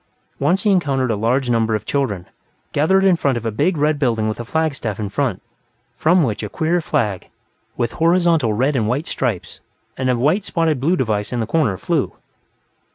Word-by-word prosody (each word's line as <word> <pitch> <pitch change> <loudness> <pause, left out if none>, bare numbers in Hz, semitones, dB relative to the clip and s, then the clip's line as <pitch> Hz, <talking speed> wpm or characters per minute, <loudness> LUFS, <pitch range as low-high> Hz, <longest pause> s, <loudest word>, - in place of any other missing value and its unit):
Once 175 +8 +1
he 210 - +3
encountered 135 -9 +1
a - - +1
large 120 +5 0
number 115 -2 +1
of 105 - -4
children, 105 -11 -1 0.5
gathered 190 +7 +3
in 190 -2 +5
front 140 -6 0
of 115 - -6
a 115 - 0
big 155 - 0
red 150 0 +1
building 115 -6 +1
with 110 - -3
a - - -3
flagstaff 135 -7 -2
in 105 -2 -3
front, 120 -3 -2 0.5
from 170 +5 +3
which 110 -6 -1
a 105 - -4
queer 170 - 0
flag, 110 - -1 0.5
with 120 - 0
horizontal 165 -6 +2
red 130 +7 +1
and 110 -4 +1
white 135 +7 -1
stripes 115 -9 -3 0.4
and 130 0 -1
a 125 - +2
white 155 - +2
spotted 165 -6 0
blue 160 +8 +2
device 105 - -1
in 125 - -2
the 115 - 0
corner, 115 - +1
flew. - - -1
130 Hz, 195 wpm, -20 LUFS, 110-160 Hz, 0.5 s, in